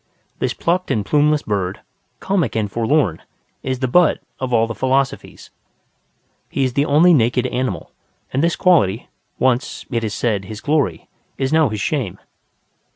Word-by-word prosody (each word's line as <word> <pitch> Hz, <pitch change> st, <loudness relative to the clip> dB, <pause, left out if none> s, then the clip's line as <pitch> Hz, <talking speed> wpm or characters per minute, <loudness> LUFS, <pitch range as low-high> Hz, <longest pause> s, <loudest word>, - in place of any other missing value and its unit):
This -, -, -1 dB
plucked 180 Hz, +2 st, 0 dB
and 105 Hz, -2 st, 0 dB
plumeless 150 Hz, +4 st, +2 dB
bird, 95 Hz, -3 st, -2 dB, 0.4 s
comic 175 Hz, -, 0 dB
and 105 Hz, -2 st, -1 dB
forlorn, 115 Hz, -, +1 dB, 0.4 s
is 130 Hz, -1 st, -3 dB
the 130 Hz, -, +1 dB
butt 170 Hz, +6 st, +4 dB, 0.2 s
of 130 Hz, -1 st, -3 dB
all 115 Hz, -1 st, +3 dB
the 115 Hz, -, -5 dB
philosophies. 130 Hz, +2 st, -2 dB, 1.0 s
He 135 Hz, -, -1 dB
is 130 Hz, -2 st, 0 dB
the 140 Hz, +3 st, +2 dB
only 160 Hz, +5 st, +5 dB
naked 125 Hz, -2 st, +2 dB
animal; 125 Hz, -9 st, -3 dB, 0.4 s
and 135 Hz, -, +1 dB
this 170 Hz, 0 st, +2 dB
quality, 125 Hz, -, +2 dB, 0.3 s
once, 130 Hz, +1 st, 0 dB
it 115 Hz, -2 st, -1 dB
is 105 Hz, -2 st, -2 dB
said, 105 Hz, -5 st, -1 dB
his 105 Hz, +2 st, -7 dB
glory, 140 Hz, -, 0 dB, 0.3 s
is 135 Hz, +2 st, -1 dB
now 160 Hz, -4 st, +4 dB
his 105 Hz, -2 st, -4 dB
shame. 130 Hz, -, -2 dB
130 Hz, 160 wpm, -19 LUFS, 110-150 Hz, 1.0 s, only